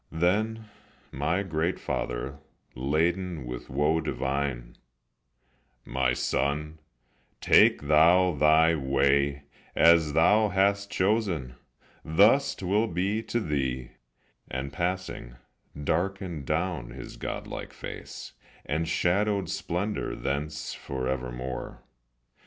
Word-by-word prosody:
Then 110 +7 0 0.4
my 80 +8 0
great 85 -1 -1
father, 65 +4 -3 0.3
laden 80 +4 -1
With - - -7
woe 75 +4 +1
divine: 65 -4 -3 1.1
"My 65 0 0
son, 75 +4 -1 0.6
take - - +5
thou 85 +5 +5
thy 80 +2 +4
way; 70 0 +1 0.3
As 80 -2 +5
thou 105 +7 +4
hast 100 +1 +1
chosen, 90 - 0 0.5
thus 105 - +4
't 95 - -7
will 105 +5 +2
be 100 +4 -1
to 120 - -2
thee;" 65 - -2 0.6
And 65 +2 -4
passing, 90 -8 -3 0.5
darkened 90 -3 -2
down 80 -5 -1
his - - -9
godlike - - -6
face, - - -9 0.3
And 80 +3 -1
shadowed 100 +4 +1
splendor 100 +5 -2
thence 75 +2 -3
forevermore. 65 -1 -4
80 Hz, 95 wpm, -27 LUFS, 70-95 Hz, 1.1 s, take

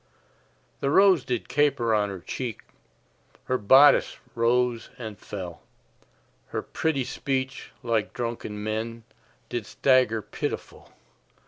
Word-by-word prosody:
The 140 - 0
rose 190 -2 +5
did 125 -3 -3
caper 135 -6 +2
on 105 -1 +2
her 95 -3 -7
cheek, 120 +3 -5 0.8
Her 130 0 -1
bodice 135 +8 +6 0.2
rose 120 0 +1
and 110 -4 -6
fell, 90 -7 -7 0.9
Her - - -4
pretty 155 -5 -1
speech, 135 +1 -3
like 115 -3 0
drunken 115 -3 -4
men, 110 +2 -3 0.5
Did 120 -3 -4
stagger 125 -5 +3
pitiful. - - -6
120 Hz, 110 wpm, -26 LUFS, 110-130 Hz, 0.9 s, bodice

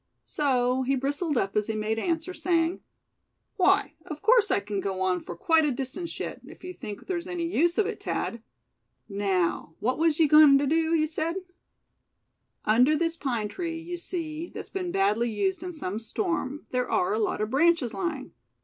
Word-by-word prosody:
So 255 -3 +1
he 265 +1 +1
bristled 285 +3 -1
up 195 -4 -1
as 210 -1 +1
he 220 - -2
made 215 +1 -1
answer, 335 +4 -2
saying: 340 -1 +1 0.8
"Why, - - +3
of 305 -3 -7
course 460 +1 +5
I - - +3
c'n 200 0 -4
go 190 -1 -3
on 185 -1 +1
for 175 - -8
quite 320 - +3
a 300 - +2
distance 270 +7 -5
yet, - - -5
if - - -14
you 365 0 -6
think 210 - -8
there's 350 -2 -3
any 350 -2 -3
use 340 0 +1
of 430 - +3
it, - - -4
Thad. 230 - -3 0.7
Now, 190 -5 -1
what 250 +6 0
was 320 -2 +3
you 325 - +5
agoin' 300 -1 +8
to 285 - +1
do, 325 +3 +2
you 310 -1 +3
said?" 320 +2 -2 1.3
"Under 250 +8 +4
this 335 0 0
pine 240 -9 -2
tree, 330 - -4
you 345 +2 -6
see, 335 -2 -5
that's - - -9
been 365 -2 -3
badly 210 +3 +2
used 375 - -1
in 360 0 -5
some 215 - -4
storm, 295 - -3
there 250 -1 -1
are 180 - +1
a 215 - 0
lot 215 - 0
of 215 +1 -2
branches 295 -4 +3
lying. 270 - -3
290 Hz, 190 wpm, -27 LUFS, 220-335 Hz, 1.3 s, agoin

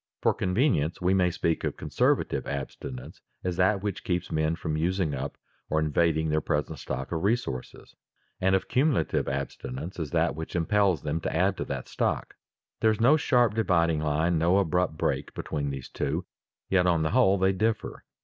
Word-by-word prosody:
For - - +4
convenience 90 - +1
we 90 +1 +2
may 90 -2 +3
speak 85 -2 -1
of - - -2
conservative - - 0
abstinence 65 -2 -6 0.2
as 90 -1 -1
that 95 +2 +2
which 100 -3 -3
keeps 90 -1 -2
men 80 +1 +1
from 80 -2 -3
using 85 0 0
up 70 +1 -4 0.3
or 80 - +2
invading 80 +1 +1
their 75 0 +1
present 75 0 -2
stock 65 +1 -5
of 80 -1 -2
resources, 100 - -2 0.5
and 95 +1 +3
of 95 - -1
cumulative 135 +2 +1
abstinence 70 +4 -5
as 80 -3 -3
that - - +1
which 80 +2 -6
impels 95 +1 +2
them 75 +2 -2
to - - -3
add 95 +4 +2
to - - -3
that - - -5
stock. - - -1 0.5
There 110 - +4
is 110 - 0
no 125 +7 +6
sharp 125 -7 +3
dividing 85 -7 +2
line, 80 +2 +1
no 85 +4 +3
abrupt 90 -3 +1
break, - - -1
between 70 -2 -3
these 70 -2 -5
two, 80 +6 -2 0.4
yet 90 -1 +3
on 85 -3 +2
the 80 - 0
whole 105 -5 +4
they 95 0 +3
differ. 110 +4 -1
85 Hz, 180 wpm, -27 LUFS, 75-95 Hz, 0.5 s, no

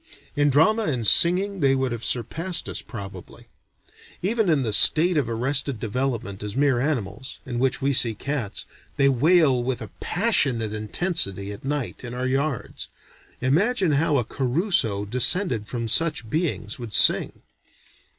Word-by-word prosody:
In 145 0 +2
drama 210 - +2
and 125 - -2
singing 185 - +4
they 135 -3 +2
would 130 -2 -2
have 115 -1 -5
surpassed 165 - -2
us - - -4
probably. 100 -5 -11 0.7
Even 220 0 0
in 150 -5 +2
the 110 -3 -2
state 170 - +5
of 140 -6 0
arrested 130 +2 0
development 115 -3 -4
as 105 -1 -6
mere 135 -2 +1
animals, 125 -4 -4
in 120 -2 -5
which 135 +1 0
we 140 +1 +1
see 115 -3 +3
cats, 135 -4 -4 0.3
they 140 - +3
wail 140 0 +3
with 125 -1 -3
a 110 -4 -7
passionate 135 - +1
intensity 105 - -1
at 100 - -10
night 140 -2 -4
in 125 0 -7
our 125 +1 -3
yards. 135 0 -3 0.5
Imagine 180 - +1
how 150 +1 +1
a 125 - 0
Caruso 130 - 0
descended 125 - +1
from 115 -1 -4
such 150 0 0
beings 150 -10 -3
would 115 -3 -5
sing. - - +4
130 Hz, 150 wpm, -23 LUFS, 115-160 Hz, 0.7 s, state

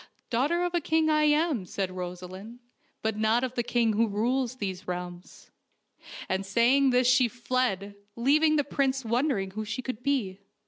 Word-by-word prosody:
" - - -40
Daughter 290 +9 +1
of 355 0 -2
a 345 - +1
king 315 +1 +2
I 305 0 +3
am," 300 - +2
said 185 +1 -3
Rosaleen, 185 +4 -7 0.2
" - - -42
but 220 -1 -1
not 220 +3 +2
of 255 -1 -2
the 245 - 0
king 235 -2 +1
who 225 +2 +2
rules 240 +4 -1
these 190 -6 -5
realms." 180 0 -7 0.8
And 190 +1 -1
saying 240 +7 +3
this 250 0 +3
she 250 0 +5
fled, 235 -4 -2 0.2
leaving 305 +6 +3
the 290 - +2
prince 270 -2 -1
wondering 235 -4 0
who 215 +3 -4
she 215 +4 -5
could 255 -2 -5
be. 245 -9 -1
240 Hz, 180 wpm, -27 LUFS, 200-270 Hz, 0.8 s, she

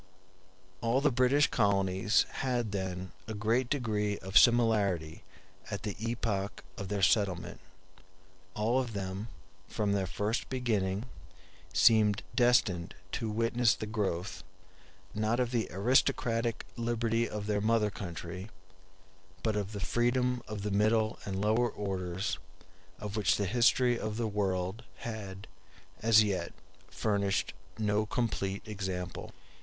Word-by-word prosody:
All 115 +3 +2
the 145 +1 +3
British 130 +4 +4
colonies 100 -1 +2
had 120 -5 0
then 95 -2 -3 0.2
a 110 - -4
great 115 +4 +1
degree 105 -7 0
of 95 +1 -9
similarity 105 -10 +4 0.5
at - - -4
the 105 - -3
epoch 105 -4 -2
of 100 - -5
their 100 0 -2
settlement. 95 -4 +2 1.0
All 115 +4 +2
of 125 -3 -3
them, 95 +1 -4 0.4
from 105 -1 -1
their 100 -2 +1
first 105 +6 -2
beginning, 110 -5 0 0.7
seemed 105 -2 +4
destined 120 -8 +2 0.2
to 115 -3 -2
witness 115 +2 +2
the - - -5
growth, 100 -4 -2 0.7
not 110 +3 0
of 125 -1 0
the 115 -3 0
aristocratic 120 - +1
liberty 115 0 0
of 105 -1 -4
their 105 -1 0
mother 110 -1 +2
country, 90 +1 -6 0.9
but 110 -2 +1
of 105 -1 -2
that 100 - -5
freedom 125 +1 +1
of 105 -1 -5
the 105 - -2
middle 110 +2 +2
and 95 -1 -3
lower 110 +4 +2
orders 95 -3 -3 0.6
of 105 0 -6
which 105 -3 +2
the 100 - 0
history 120 +3 +3
of 110 0 -3
the 115 - 0
world 100 +1 -1 0.2
had 100 -4 -6 0.6
as 110 0 +6
yet 100 -3 -2 0.4
furnished 100 -2 0 0.2
no 105 0 +1
complete 100 -5 -2
example. 95 -4 -4
105 Hz, 130 wpm, -31 LUFS, 100-115 Hz, 1.0 s, as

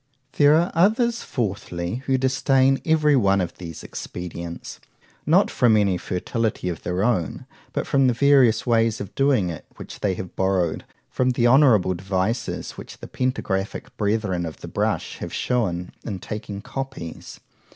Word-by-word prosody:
There 145 +1 +6
are 170 +3 +2
others, 225 +7 +2
fourthly, 95 -4 -3
who 135 -1 +3
disdain 135 +1 +2
every 155 -2 +3
one 100 -6 +3
of 90 -2 -4
these 85 -3 -8
expedients;—not 85 -1 -3
from 115 -3 +4
any 100 -3 +2
fertility 100 +1 -2
of 85 - -5
their 90 +2 -1
own, 105 - 0 0.3
but - - -2
from 135 -1 +3
the 125 - +3
various 130 -4 +4
ways 115 -2 +2
of 100 - -7
doing 130 -10 +2
it, 80 - -9
which - - -10
they 95 -3 0
have 90 -1 -7
borrowed 95 -4 0 0.2
from 130 0 0
the 120 -1 +1
honourable 120 -8 +5
devices 95 +5 -2
which - - -11
the - - -10
Pentagraphic 105 -6 -3
Brethren 100 -4 0
of 80 -2 -7
the - - -7
brush - - -2
have - - -6
shewn 90 -8 -1
in 100 -4 -4
taking 100 +1 -6
copies. 130 -12 -7
110 Hz, 150 wpm, -23 LUFS, 90-130 Hz, 0.3 s, There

